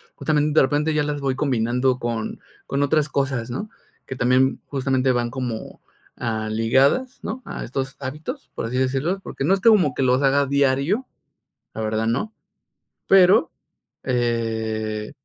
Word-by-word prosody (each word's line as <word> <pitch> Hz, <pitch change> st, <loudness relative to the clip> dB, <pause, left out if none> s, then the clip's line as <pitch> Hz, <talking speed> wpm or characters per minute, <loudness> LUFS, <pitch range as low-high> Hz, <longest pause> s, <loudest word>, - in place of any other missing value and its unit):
justamente 150 Hz, 0 st, 0 dB
de -, -, +6 dB
repente 150 Hz, +3 st, +1 dB
ya 150 Hz, -, +2 dB
las 145 Hz, -1 st, -3 dB
voy 135 Hz, -1 st, 0 dB
combinando 125 Hz, -1 st, +1 dB
con 115 Hz, -3 st, -3 dB, 0.3 s
con 140 Hz, -, -1 dB
otras 150 Hz, +1 st, +1 dB
cosas, 130 Hz, -5 st, -1 dB
¿no?, 205 Hz, -, -4 dB, 0.4 s
que 135 Hz, -, -5 dB
también 130 Hz, +1 st, +2 dB
justamente 130 Hz, -1 st, +1 dB
van 120 Hz, -1 st, 0 dB
como, 120 Hz, -2 st, -5 dB, 0.4 s
ah, 110 Hz, -2 st, -2 dB
ligadas, 135 Hz, -, +2 dB
¿no?, 255 Hz, -, -5 dB
a -, -, -6 dB
estos 135 Hz, +2 st, -4 dB
hábitos, 150 Hz, -, -6 dB
por -, -, -3 dB
así 120 Hz, +3 st, -3 dB
decirlo, 135 Hz, +8 st, 0 dB
porque, 135 Hz, -, -6 dB
no 155 Hz, -, +3 dB
es 195 Hz, -, +1 dB
que 230 Hz, -, +6 dB
como 185 Hz, -, +4 dB
que -, -, -3 dB
los 130 Hz, +2 st, +2 dB
haga 140 Hz, +1 st, +3 dB
diario, 140 Hz, -, +1 dB, 0.7 s
la 110 Hz, -, -5 dB
verdad 110 Hz, +1 st, -1 dB
no. 140 Hz, -, -1 dB, 0.7 s
Pero 190 Hz, -1 st, +5 dB, 0.5 s
eh, 110 Hz, -3 st, -2 dB
130 Hz, 155 wpm, -22 LUFS, 120-150 Hz, 0.7 s, de